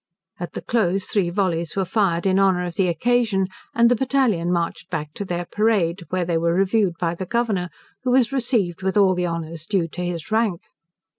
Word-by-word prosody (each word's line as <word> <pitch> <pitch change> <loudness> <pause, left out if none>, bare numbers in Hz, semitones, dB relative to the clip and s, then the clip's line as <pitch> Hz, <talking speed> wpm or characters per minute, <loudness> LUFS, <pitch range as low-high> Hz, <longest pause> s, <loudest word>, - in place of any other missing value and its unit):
At 175 -1 -6
the - - -6
close 195 -5 +1
three 190 -4 0
vollies 175 -3 -1
were 195 -1 0
fired 185 -3 +1
in 190 0 +3
honour 190 -2 +3
of 175 - -5
the 185 +1 +1
occasion, 215 0 +1 0.3
and 235 0 +5
the 245 - +4
battalion 245 -9 +1
marched 170 0 -2
back 150 -3 -4
to - - -5
their 175 -2 -3
parade, 195 -4 +1
where 185 -1 0
they 165 -1 0
were 170 +1 +1
reviewed 195 -1 +2
by 170 -2 0
the 185 +1 -6
Governor, 210 -6 0 0.3
who 255 - -2
was 250 0 +3
received 230 -10 0
with 190 +2 0
all 195 -2 +5
the 180 -1 -1
honours 165 -1 -5
due 190 -5 +1
to 180 +3 -5
his 175 +1 -4
rank. 220 -6 +1
185 Hz, 205 wpm, -22 LUFS, 170-215 Hz, 0.3 s, and